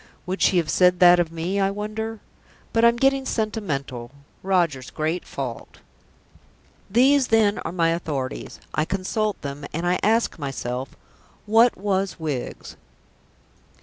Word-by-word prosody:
Would 185 +2 -4
she 185 - +4
have 165 -3 +1
said 180 -1 +4
that 175 -1 +7
of 170 -2 0
me, 170 +4 -2
I 195 0 +2
wonder? 215 +2 -5 0.5
But 225 - +2
I'm 235 0 +6
getting 270 +2 +2
sentimental 155 - -3 0.3
Roger's 170 -9 0
great 160 +3 -2
fault. 125 -4 -6 1.1
These 260 +5 +4
then 220 -2 +3
are 160 - -4
my 170 -2 +1
authorities; 145 -6 -4
I 150 - +1
consult 195 +4 -2
them, 140 0 -6
and 165 +2 -3
I 180 +1 +1
ask 225 -3 +1
myself, 130 -2 -4 0.5
What 225 +3 +4
was 195 -2 -1
Wiggs? 150 -6 -5
180 Hz, 135 wpm, -23 LUFS, 155-215 Hz, 1.1 s, that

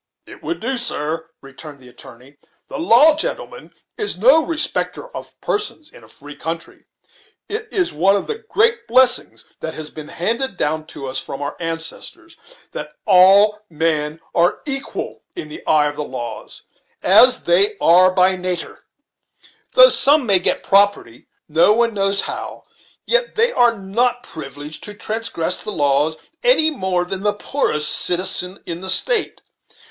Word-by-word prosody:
"It - - -14
would 345 - -5
so, 260 +2 -1
sir," 160 -8 -3
returned 140 +2 -12
the 130 -2 -16
attorney. 130 +1 -15 0.3
"The - - -6
law, 305 +1 +5
gentlemen, 315 - -5 0.3
is 415 - -2
no 265 +11 +4
respecter 335 +9 -2
of - - -10
persons 410 -7 -4
in - - -16
a - - -17
free 145 +1 -12
country. 165 +3 -7 0.6
It 435 +1 -4
is 370 -4 0
one 190 +6 +2
of 200 - -2
the 450 0 -5
great 455 +2 +1
blessings 250 +1 +3
that 160 - -5
has 155 -1 -5
been 155 -1 -9
handed 230 +4 -1
down 155 +1 -2
to 145 -3 -9
us 130 0 -2
from 135 - -8
our 145 - -5
ancestors, 165 - -6 0.4
that - - -7
all 200 +2 +5
men 155 -1 -2
are 175 0 +1
equal 275 -1 -5
in 155 - -8
the 150 - -10
eye 150 -1 +3
of 145 0 -4
the 150 - -3
laws, 130 -4 -8 0.4
as - - +6
they 425 -3 +3
are 185 +2 +5
by 185 0 +3
nater. 180 -1 -5 0.9
Though - - +8
some 290 -1 +2
may 195 -4 +3
get 180 - 0
property, 195 - +1 0.2
no 165 +7 +3
one 235 0 +1
knows 195 -1 +1
how, - - -6 0.4
yet - - 0
they 465 +2 +2
are 240 - +2
not 240 +6 -1
privileged 150 0 -10
to 210 - -10
transgress 215 -6 -3
the 215 - -5
laws 145 0 +1 0.2
any - - +5
more 185 -9 -2
than 190 +1 -6
the 205 0 0
poorest 150 - -1
citizen 180 +1 0
in 170 0 -6
the 190 - -4
State. 445 - +2
190 Hz, 160 wpm, -18 LUFS, 155-265 Hz, 0.9 s, Though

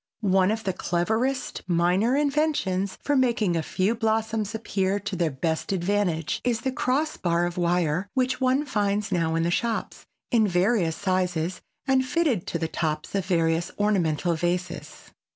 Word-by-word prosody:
One 190 0 +4
of 220 +1 -1
the 190 - -1
cleverest 220 +10 -1
minor 180 +8 +2
inventions 285 -11 0
for 290 - +1
making 235 -8 +2
a 165 - +1
few 185 +7 0
blossoms 220 -2 -1
appear 200 -2 -1
to 205 0 -4
their 170 -2 +1
best 160 +6 -2
advantage 180 -5 0
is 235 -3 0
the 265 - -1
cross 275 +5 0
bar 170 -1 +1
of 175 0 -3
wire 175 0 +1
which 255 0 0
one 260 +3 +2
finds 205 -4 -1
now 165 -3 +1
in 165 - +1
the 170 - +1
shops, 230 +4 -2 0.2
in 225 -3 +4
various 180 -2 +2
sizes 185 -2 -1 0.2
and 265 -1 +3
fitted 260 - 0
to - - -2
the 165 -1 -2
tops 155 -2 -3
of 195 -2 -1
various 165 -2 +1
ornamental 175 -5 +1
vases. 175 -2 -3
190 Hz, 160 wpm, -25 LUFS, 170-225 Hz, 0.2 s, One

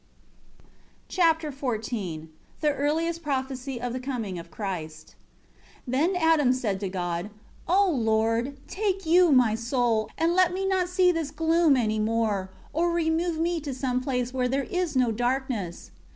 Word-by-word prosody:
Chapter 325 -3 +2
XIV 220 - -4 0.3
The 300 - +3
earliest 325 +4 -1
prophesy 265 -3 -3
of 245 0 -3
the 255 - -3
coming 235 -9 -4
of 170 0 -10
Christ. 160 -4 -6 0.7
1 245 - -6
Then 320 +9 +2
Adam 320 -7 +4
said 215 -7 -2
to 195 -1 -3
God: 175 0 -3 0.4
"O 390 +4 +4
Lord, 230 -1 +1
take 390 -2 -2
You 345 +1 +5
my 250 -5 +5
soul, 230 -1 0
and 330 +1 +2
let 365 -1 +4
me 385 +1 -2
not 375 -2 +1
see 365 0 +4
this 330 -4 -2
gloom 325 -1 +3
any 215 -3 0
more; 215 -3 0 0.2
or 340 +3 +1
remove 335 0 0
me 335 +1 0
to 280 -3 -5
some 255 -1 -1
place 250 -2 -2
where 255 -1 +1
there 270 +2 0
is 360 -5 -1
no 250 -3 +3
darkness." 245 -6 -2
265 Hz, 155 wpm, -26 LUFS, 225-330 Hz, 0.7 s, You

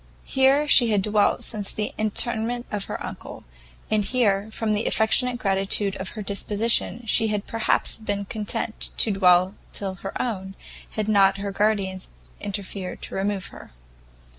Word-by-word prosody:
Here 270 +3 +3
she 245 -4 +6
had 205 -3 +1
dwelt 210 0 +2
since 210 -3 0
the 210 - -3
interment 230 +2 0
of 205 -1 -2
her - - -5
uncle; - - -9 0.5
and 215 -1 +2
here, 205 -3 +1
from 220 -1 -2
the 210 +1 -1
affectionate 245 +3 +2
gratitude 195 -1 +1
of 190 - -4
her 210 - -4
disposition, 210 +2 0
she 225 +1 +3
had 210 -1 -2
perhaps 225 -1 0
been 205 -2 -3
content 215 +1 -4
to 220 - +6
dwell 185 -1 +4 0.2
till 195 -2 -2
her 195 - -5
own, 195 -5 -3 0.3
had 215 -1 -3
not 195 -2 +4
her 200 0 -4
guardians 195 -2 -1 0.3
interfered 200 -2 -5
to - - -6
remove 195 0 -2
her. - - -13
210 Hz, 155 wpm, -24 LUFS, 195-220 Hz, 0.5 s, she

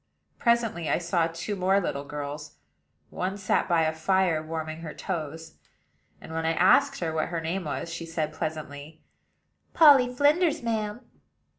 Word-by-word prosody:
Presently 230 -9 +1
I - - +2
saw 170 -1 0
two 170 +5 -5
more 190 +1 +2
little 140 -6 -3
girls: 145 +1 -6 0.6
one 190 +2 -3
sat 195 -1 0
by 170 -2 +3
a 155 0 0
fire 170 0 +1
warming 160 0 -5
her 160 -2 -7
toes; 160 -3 -5 0.6
and, 160 - -10
when 165 0 -2
I 165 0 +1
asked 180 +1 +3
what 160 -1 -1
her 170 -1 -3
name 170 +3 -3
was, 160 +3 -4
she 170 -1 -6
said 155 -2 -3
pleasantly: 155 -1 -6 0.7
"Polly 280 -6 +7
Flinders, 300 +3 +2
ma'am." 220 0 -2
165 Hz, 150 wpm, -27 LUFS, 155-195 Hz, 0.7 s, Polly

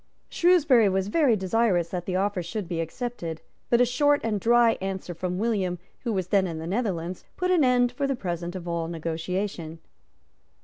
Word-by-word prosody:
Shrewsbury 300 - +4
was 190 +1 0
very 275 -2 +3
desirous 190 -3 +1
that 175 -1 -5
the 185 - -1
offer 195 0 0
should 175 +3 -5
be 165 -1 -2
accepted; 165 -2 -5 0.3
but 240 0 +4
a - - +6
short 290 +4 +3
and 215 -2 0
dry 235 +2 +5
answer 190 -2 -4
from 180 +1 -3
William, 195 -5 0 0.2
who 235 - -3
was 185 -4 -2
then 195 -2 +3
in 165 -2 -5
the 160 - -6
Netherlands, 185 -3 -2
put 365 0 0
an 345 -5 +4
end 245 -1 +3
for 275 +3 -2
the 275 - 0
present 175 -5 -4
to 185 -2 -6
all 170 -1 -2
negotiation. 165 +1 -4
195 Hz, 185 wpm, -26 LUFS, 175-240 Hz, 0.3 s, a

